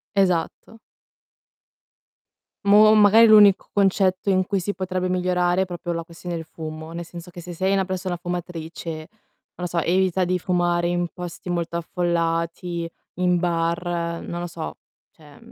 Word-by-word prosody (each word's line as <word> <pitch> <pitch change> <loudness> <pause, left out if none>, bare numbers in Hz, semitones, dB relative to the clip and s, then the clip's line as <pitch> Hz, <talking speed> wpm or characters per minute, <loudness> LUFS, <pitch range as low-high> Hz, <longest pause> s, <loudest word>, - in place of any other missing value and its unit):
Esatto. 190 +3 0 1.9
Boh, 210 +2 +7
magari 215 +2 +7
l'unico 210 -3 +6
concetto 195 -1 +2
in 185 -1 +3
cui 200 0 -1
si 200 +3 -3
potrebbe 185 0 -2
migliorare, 180 0 +1
è - - +1
proprio 175 -1 -5
la 165 0 -3
questione 170 +1 -7
del 165 - -4
fumo, 155 0 -8
nel 170 +1 -6
senso 175 +1 -10
che 175 - -10
se 175 +1 -8
sei 190 +3 0
una 195 -1 +2
persona 185 -1 -3
fumatrice, 175 -2 -6
non 155 - -7 0.5
lo 180 - -5
so, 175 0 -3
evita 185 +2 +1
di 180 +1 0
fumare 175 -1 +1
in 175 0 0
posti 180 0 -8
molto 170 -1 -2
affollati, 170 0 -2 0.3
in 180 0 +2
bar, 170 0 -1
non 175 0 -5
lo 175 - -3
so, 165 -2 -6 0.4
cioè, 150 -3 -18
mhmm, - - -17
175 Hz, 160 wpm, -23 LUFS, 170-185 Hz, 1.9 s, Boh